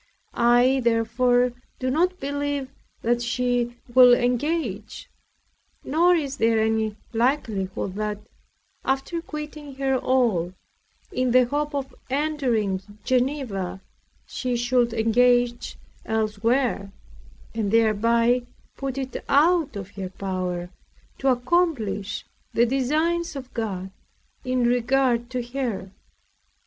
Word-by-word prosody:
I 245 +3 +4
therefore 240 +2 +2 0.2
do 255 0 -1
not 360 +5 +1
believe 285 -1 -2 0.3
that 240 +1 +1
she 240 0 0 0.2
will 250 -1 +8
engage; 245 - -2 0.7
nor 345 +5 +4
is 285 -4 -2
there 225 -1 +3
any 220 -1 0 0.2
likelihood 225 -7 -1
that, 210 -1 -2 0.7
after 270 +6 -1
quitting 300 -3 -7
her 270 0 0
all, 220 -10 +1 0.6
in 255 0 0
the 250 +1 +5
hope 290 +3 -2
of 270 -2 -3 0.2
entering 255 -9 0 0.2
Geneva, 245 -8 -1 0.5
she 250 -1 -3
should 240 0 +2
engage 240 +2 +2 0.3
elsewhere, 220 0 0 0.6
and 220 -3 -1
thereby 230 +3 +3 0.4
put 270 -1 -4
it 265 -1 -4
out 315 -1 +3
of 200 -1 -6
her 190 -2 -6
power 185 -2 -4 0.5
to 270 - -1
accomplish 245 - 0 0.3
the 235 - +4
designs 305 +7 0
of 265 -2 -8
God 190 -5 -3 0.5
in 255 -1 0
regard 245 0 +2
to 255 -1 -2
her. 240 -7 -4
245 Hz, 105 wpm, -24 LUFS, 220-270 Hz, 0.7 s, will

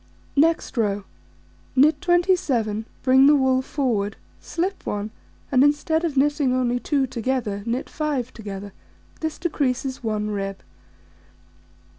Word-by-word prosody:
Next 315 -2 +2
row: 205 -3 +1 0.7
Knit 295 +6 +4
27, 315 - +1 0.2
bring 265 +1 +6
the 295 - +7
wool 260 -2 +3
forward, 235 -7 -1 0.2
slip 370 +3 -3
1, 205 +1 -3 0.4
and 260 -1 +5
instead 295 +3 +2
of 310 -5 -2
knitting 285 -2 +2
only 245 -1 +1
2 275 +1 +1
together, 240 -4 -2
knit 240 +3 -1
5 285 -6 -2
together: 200 -2 -7 0.5
this 315 -1 -3
decreases 265 -6 -1
1 210 -1 -1
rib. 195 -1 -3
260 Hz, 120 wpm, -23 LUFS, 220-295 Hz, 0.7 s, the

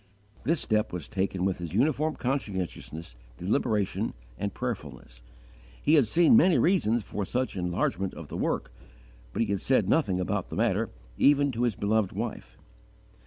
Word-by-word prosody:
This 165 +4 +2
step 110 -1 0
was 85 -4 -5
taken 95 -1 -1
with 95 -2 0
his 85 0 -5
uniform 150 +5 +2
conscientiousness, 95 - -4 0.2
deliberation, 105 - 0 0.2
and 100 +11 -3
prayerfulness. 75 - -6 0.6
He 150 - +2
had 145 -8 +5
seen 170 - +5
many 185 - +6
reasons 120 - +2
for 105 - -4
such 125 +5 -2
enlargement 90 +1 -1
of - - -8
the - - -7
work, - - -2 0.6
but 115 - 0
he 105 - -2
had 100 - -1
said 130 - +2
nothing 100 - +2
about 90 - -2
the - - -5
matter - - +1 0.3
even 145 0 +5
to 120 -1 -3
his 120 -4 +1
beloved 105 -1 +1
wife. 95 - -5
105 Hz, 160 wpm, -28 LUFS, 90-135 Hz, 0.6 s, many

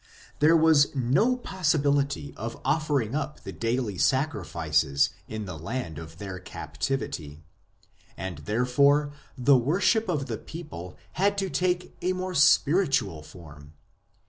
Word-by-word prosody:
There 160 +3 +6
was 155 -3 +4
no 140 - +2
possibility 145 - 0
of 115 +3 -6
offering 145 -7 0
up 150 0 -4
the - - -6
daily 115 -4 -2
sacrifices 80 - +1 0.2
in 110 -1 -5
the 85 -5 -7
land 85 - -4
of 80 0 -10
their 95 -1 -6
captivity; 80 - -5 0.7
and 95 -5 -5
there 110 +11 -1
fore 145 +3 +3 0.2
the 130 +2 +5
worship 190 - +2
of 150 -6 0
the - - -5
people 145 - -9
had 200 +2 +1
to 195 -1 -2
take 180 0 -1
a 185 - +1
more 185 0 -4
spiritual 140 - +3
form. 75 -3 -13
135 Hz, 130 wpm, -27 LUFS, -, 0.7 s, There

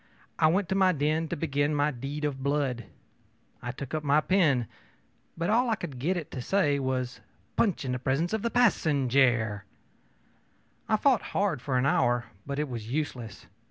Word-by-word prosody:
I 155 - +5
went 180 +4 +2
to - - +1
my 190 -1 +4
den 155 +2 0
to - - -3
begin 145 -1 0
my 145 +1 +2
deed 140 +4 -4
of 135 -2 -3
blood. 140 -4 -1 0.8
I 120 - -4
took 135 +2 -8
up 155 -1 -1
my 145 +1 +4
pen, 155 - +2 0.7
but 170 +4 0
all 240 +2 +3
I 225 - +2
could 135 -10 -7
get 175 +8 0
it 160 - -6
to 130 - -5
say 145 -2 +1
was, 130 -2 -2 0.3
ōPunch 195 -10 +1
in 130 - -2
the 125 - -2
presence 140 - 0
of 220 - 0
the 235 - 0
passenjare.ö 135 - +2 1.3
I 215 - +4
fought 255 0 +3 0.2
hard 195 -10 +1
for 130 -2 -1
an 125 - +2
hour, 120 -7 +2 0.2
but 140 0 -3
it 150 0 -1
was 115 -3 -6
useless. 130 -7 -4
145 Hz, 185 wpm, -28 LUFS, 130-170 Hz, 1.3 s, I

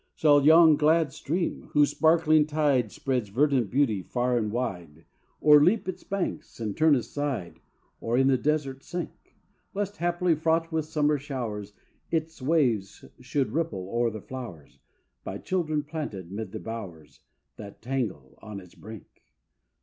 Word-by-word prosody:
Shall 145 -2 +4
yon 160 0 +7
glad 155 -1 +3
stream, 170 +4 -3
whose 145 -1 +4
sparkling 155 -2 +4
tide 145 -7 +1
Spreads 125 -6 -2
verdant 130 -1 +2
beauty 120 -5 +1
far 125 +5 -1
and 110 -3 0
wide, 90 -10 -4 0.4
O'erleap 155 +8 +5
its 185 - -5
banks 195 -9 -4
and 110 -3 -3
turn 155 -2 +4
aside, 130 -6 -3 0.4
Or 115 +2 -1
in 135 - +4
the 135 -1 +4
desert 140 -2 -1
sink; 175 0 -7 0.4
Lest, 205 0 -3
haply, 175 0 +1
fraught 165 +1 0
with 160 -1 -1
summer 150 -1 +1
showers, 115 -8 -5 0.4
Its 160 -2 -2
waves 130 -9 0
should 130 +2 -1
ripple 155 - -2
o'er 120 0 +1
the 110 -2 -7
flowers 95 - -9 0.4
By - - -5
children 155 -5 -1
planted 145 - -6
'mid 100 -1 -5
the 110 - -6
bowers 100 -10 -8 0.4
That 100 -1 -10
tangle 110 - -4
on 105 -1 -8
its 90 -2 -15
brink? 110 -2 -11
135 Hz, 145 wpm, -27 LUFS, 110-155 Hz, 0.4 s, yon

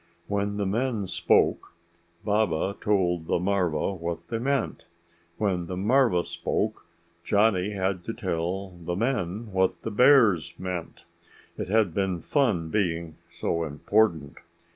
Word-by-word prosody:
When 100 0 -1
the 100 - -1
men 110 +1 -1
spoke, 90 - +1 0.5
Baba 100 -3 +1
told 90 -6 +1
the - - +2
marva 90 -2 0
what 85 -2 -5
they 115 - -2
meant. 135 +3 -1 0.5
When 90 -5 -1
the 90 - -4
marva 105 -3 +3
spoke, - - -3 0.4
Johnny 105 -1 +2
had 95 -2 -1
to - - -3
tell 90 +4 -2
the 85 0 -5
men 110 -1 -2
what 95 0 0
the 115 - -3
bears 105 - +5
meant. 90 -2 -5 0.5
It - - -4
had 105 -3 +2
been 95 -2 -1
fun 105 - +1
being 85 -6 -1
so 85 0 -2
important. 80 0 0
95 Hz, 130 wpm, -26 LUFS, 85-105 Hz, 0.5 s, bears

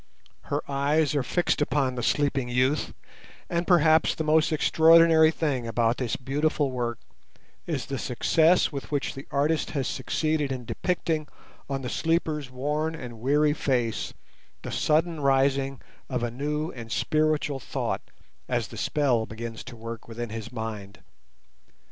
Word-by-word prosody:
Her - - -2
eyes 145 +2 +1
are 145 - +1
fixed 175 +5 0
upon 140 -3 +1
the 125 - -4
sleeping 135 0 +1
youth, 130 +4 +1 0.6
and 170 0 0
perhaps 160 -3 +4
the 160 - -2
most 155 +1 +3
extraordinary 160 +1 +6
thing 145 -7 -1
about 115 0 +1
this 125 -4 -1
beautiful 145 +2 0
work 120 -2 -2 0.7
is 155 -6 -2
the 135 -2 -4
success 160 +9 +3
with 140 0 -6
which 145 -2 -1
the 135 0 -9
artist 150 +3 +1
has 135 - 0
succeeded 150 +1 -1
in 125 -2 -4
depicting 165 -1 -1 0.4
on 135 -1 -3
the - - -3
sleeper's 155 -1 -1
worn 150 +5 -2
and 120 -6 -8
weary 145 +3 +3
face 120 -7 -1 0.5
the - - -5
sudden 160 +1 +1
rising 135 -1 +2 0.3
of 125 -2 -2
a 120 - -1
new 150 +5 -2
and 115 -2 -9
spiritual 155 -2 +1
thought - - -3 0.5
as - - -1
the - - -10
spell 125 -7 +1
begins 115 +1 -7
to 125 -1 -9
work 115 0 -8
within 120 0 -5
his 110 0 -6
mind. 105 -6 -6
140 Hz, 150 wpm, -26 LUFS, 125-155 Hz, 0.7 s, extraordinary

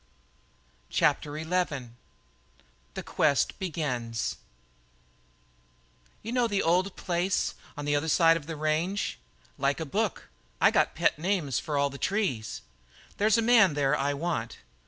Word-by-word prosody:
CHAPTER 150 0 +1
XI 160 -6 -1 1.1
THE - - -4
QUEST 145 -3 +1
BEGINS 125 - -2 1.9
"You 225 - -5
know 245 -1 +2
the 205 -3 0
old 180 +4 +2
place 180 +2 0 0.2
on 145 - -4
the 145 0 +1
other 145 +3 0
side 165 +1 +5
of 155 -3 -5
the 165 - -4
range?" 155 +6 -1 0.4
"Like 140 0 +1
a 160 - -3
book. 205 +6 -2 0.3
I - - +5
got - - +2
pet - - +1
names 170 - 0
for 150 -2 -3
all 140 0 +2
the 140 - -9
trees." 180 - -1 0.5
"There's 215 +2 +3
a 230 - +2
man 225 -9 +5
there 145 0 +2
I 140 +1 0
want." 140 -7 -3
160 Hz, 135 wpm, -28 LUFS, 140-190 Hz, 1.9 s, side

